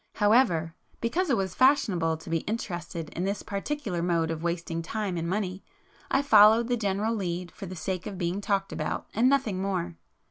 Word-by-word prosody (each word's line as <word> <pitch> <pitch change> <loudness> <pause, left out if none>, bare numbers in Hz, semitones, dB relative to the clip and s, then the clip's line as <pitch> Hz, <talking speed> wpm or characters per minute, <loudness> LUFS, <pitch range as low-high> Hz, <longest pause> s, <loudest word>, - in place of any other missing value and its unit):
However, 205 -7 +3 0.3
because 325 +10 0
it 265 - +3
was 190 -2 -2
'fashionable' 185 - +3
to - - -10
be 165 - +2
interested 175 -6 -4
in 175 - -4
this 200 +2 -2
particular 200 -3 -3
mode 170 -2 +1
of 160 -1 -4
wasting 170 -1 -2
time 195 +2 -3
and 170 0 -2
money, 185 -1 -2 0.5
I 275 - +2
followed 225 -1 +6
the 245 - +2
general 210 0 0
'lead,' 180 -4 -3
for 195 - -8
the 185 - -7
sake 185 +3 -3
of 200 -3 -6
'being 180 +2 -2
talked 195 -2 0
about,' - - -3
and 240 +4 +4
nothing 235 -9 +1
more. 180 -3 -2
195 Hz, 185 wpm, -27 LUFS, 170-220 Hz, 0.5 s, followed